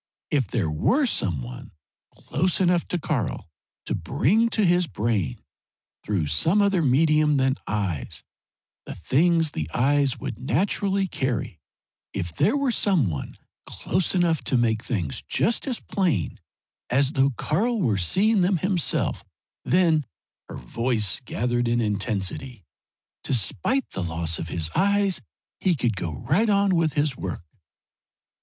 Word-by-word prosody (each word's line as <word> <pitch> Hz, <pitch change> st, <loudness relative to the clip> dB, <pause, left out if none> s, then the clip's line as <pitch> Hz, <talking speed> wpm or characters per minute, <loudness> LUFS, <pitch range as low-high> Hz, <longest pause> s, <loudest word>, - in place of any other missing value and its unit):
If 135 Hz, -6 st, +1 dB
there 90 Hz, -7 st, -1 dB
were 250 Hz, -, +2 dB
some 85 Hz, -, 0 dB
one -, -, -9 dB, 0.4 s
close 180 Hz, +3 st, 0 dB
enough 180 Hz, -2 st, +2 dB
to 180 Hz, -, -1 dB
Karl 140 Hz, -, -2 dB, 0.4 s
to -, -, -2 dB
bring 220 Hz, -, +1 dB
to 215 Hz, -3 st, +1 dB
his 175 Hz, 0 st, +3 dB
brain, 105 Hz, -, -2 dB, 0.6 s
through 100 Hz, -7 st, -1 dB
some 160 Hz, -, +2 dB
other 200 Hz, -3 st, +3 dB
medium 150 Hz, +1 st, +3 dB
than 130 Hz, 0 st, +2 dB
eyes, 95 Hz, -9 st, -3 dB, 0.6 s
the -, -, -6 dB
things 160 Hz, -, +2 dB
the 75 Hz, 0 st, -4 dB
eyes 140 Hz, +1 st, +2 dB
would 110 Hz, -, -5 dB
naturally 195 Hz, -, 0 dB
carry; 130 Hz, -, -3 dB, 0.5 s
if 85 Hz, -2 st, -3 dB
there 220 Hz, -, +2 dB
were 280 Hz, -3 st, +1 dB
some 180 Hz, -, +2 dB
one 75 Hz, -, -6 dB, 0.3 s
close 185 Hz, +1 st, -1 dB
enough 170 Hz, -3 st, +2 dB
to 135 Hz, -, +2 dB
make 115 Hz, -2 st, +1 dB
things 90 Hz, -, -2 dB
just 235 Hz, +5 st, +1 dB
as 250 Hz, -3 st, -1 dB
plain 170 Hz, -, -1 dB, 0.6 s
as 135 Hz, +2 st, +2 dB
though 135 Hz, -2 st, +3 dB
Karl 225 Hz, +10 st, 0 dB
were 115 Hz, -, +1 dB
seeing 200 Hz, -, +2 dB
them 180 Hz, +1 st, +2 dB
himself, 180 Hz, +1 st, 0 dB, 0.4 s
then" 165 Hz, -3 st, +3 dB, 0.5 s
her -, -, -7 dB
voice 110 Hz, -, -1 dB
gathered 120 Hz, +1 st, -1 dB
in 120 Hz, 0 st, +1 dB
intensity 105 Hz, +2 st, -3 dB, 0.6 s
"despite 130 Hz, -, 0 dB
the -, -, -4 dB
loss 85 Hz, -1 st, -2 dB
of 80 Hz, -, -5 dB
his 80 Hz, -2 st, -1 dB
eyes, 200 Hz, -4 st, +2 dB, 0.4 s
he 185 Hz, -3 st, +2 dB
could 120 Hz, -6 st, 0 dB
go 85 Hz, -6 st, -5 dB
right 220 Hz, +3 st, +2 dB
on 200 Hz, -1 st, +3 dB
with 165 Hz, -3 st, +1 dB
his 145 Hz, -2 st, 0 dB
work." 90 Hz, -6 st, -6 dB
135 Hz, 140 wpm, -24 LUFS, -, 0.6 s, his